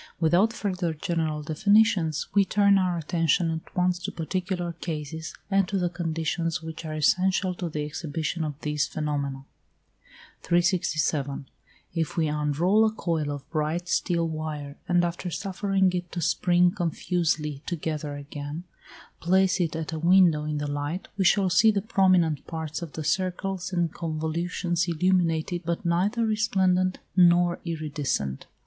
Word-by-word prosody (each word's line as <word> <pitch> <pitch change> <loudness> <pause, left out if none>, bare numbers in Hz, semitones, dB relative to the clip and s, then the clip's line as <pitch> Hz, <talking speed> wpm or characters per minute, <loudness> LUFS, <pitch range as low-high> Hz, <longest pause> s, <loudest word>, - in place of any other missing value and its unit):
Without 175 +7 +3
further 180 -7 -2
general 155 -1 -2
definitions, 180 -1 +2
we 200 - +5
turn 200 0 +4
our 180 -2 0
attention 165 +1 +1
at 160 0 -7
once 180 0 +2
to 180 - -4
particular 175 +1 -3
cases, 160 -1 -5 0.2
and 195 -1 +3
to 195 - -1
the 175 -2 0
conditions 165 0 -2
which 160 0 -7
are 155 -1 -4
essential 185 +4 +2
to 175 -1 -4
the 150 -1 -3
exhibition 155 +2 -3
of 150 -2 -4
these 150 -1 0
phenomena. 140 -3 -3 1.0
367. 155 -6 0 0.5
If 165 -1 -2
we 160 -2 +2
unroll 150 +8 +2
a 220 - +3
coil 165 -8 -2
of 145 -1 -6
bright 160 +2 -1
steel 170 -1 +1
wire, 155 -3 -5
and 175 0 +3
after 175 +1 -3
suffering 195 0 0
it 175 -1 -3
to 175 - -3
spring 175 +2 +3
confusedly 165 -5 -1
together 155 -3 -3
again, 145 +3 -6 0.6
place 190 +2 +3
it 165 -2 -1
at 160 0 -4
a 160 - -3
window 170 -3 +4
in 150 0 -2
the 145 - -2
light, 145 +5 -3
we 195 -2 0
shall 190 +1 +4
see 210 +5 +6
the 205 -2 +2
prominent 185 - +2
parts 160 -1 -4
of 165 -4 -7
the 155 - -5
circles 185 +3 -1
and 175 -3 0
convolutions 170 +2 -2
illumined, 170 -1 +1 0.2
but 170 +1 -3
neither 195 +7 +1
resplendent 190 -4 +2 0.2
nor 175 -1 +5
iridescent. 145 - -3
170 Hz, 145 wpm, -26 LUFS, 155-185 Hz, 1.0 s, see